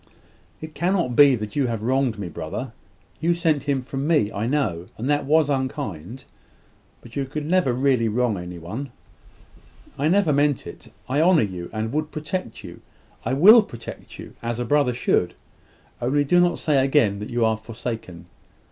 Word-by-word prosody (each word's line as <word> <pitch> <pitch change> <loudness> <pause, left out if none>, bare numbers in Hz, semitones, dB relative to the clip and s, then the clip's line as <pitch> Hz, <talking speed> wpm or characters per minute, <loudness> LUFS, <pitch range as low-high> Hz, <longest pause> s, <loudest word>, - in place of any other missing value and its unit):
"It 155 0 -8
cannot 170 -5 0
be 140 -1 +7
that 105 -2 -6
you 140 -3 +1
have 115 -2 -3
wronged 130 -2 +1
me, 100 -3 -5
brother. 80 - -6 0.5
You 170 +1 +1
sent 160 -5 0
him 140 -3 0
from 135 +2 -4
me, 150 -11 +2
I 105 +3 -3
know; 105 - -1
and 120 - -4
that 145 -1 +1
was 155 +1 +3
unkind: 130 - -4 0.8
but 115 - -14
you 140 - -1
could 150 +3 -5
never 175 -4 +2
really 125 -2 +2
wrong 115 0 0
any 90 -1 -7
one." 110 +12 -6 1.1
"I 145 - +2
never 180 -2 +3
meant 145 -1 +1
it. - - -11 0.2
I 135 +4 +1
honour 170 -3 +5
you, 90 -4 -5
and 110 +2 -3
would 155 +1 -1
protect 155 - -5
you - - -11 0.4
I 130 - 0
will 210 - +8
protect 120 - -10
you - - -10
as 115 0 -3
a 120 - -2
brother 140 -1 +2
should. 90 -7 0 0.7
Only 140 +4 +1
do 175 +5 +3
not 175 -1 +2
say 145 -4 +2
again 125 -8 +2
that 105 - -6
you 120 -1 +1
are 110 0 +2
forsaken. 110 -5 -7
130 Hz, 180 wpm, -23 LUFS, 110-150 Hz, 1.1 s, will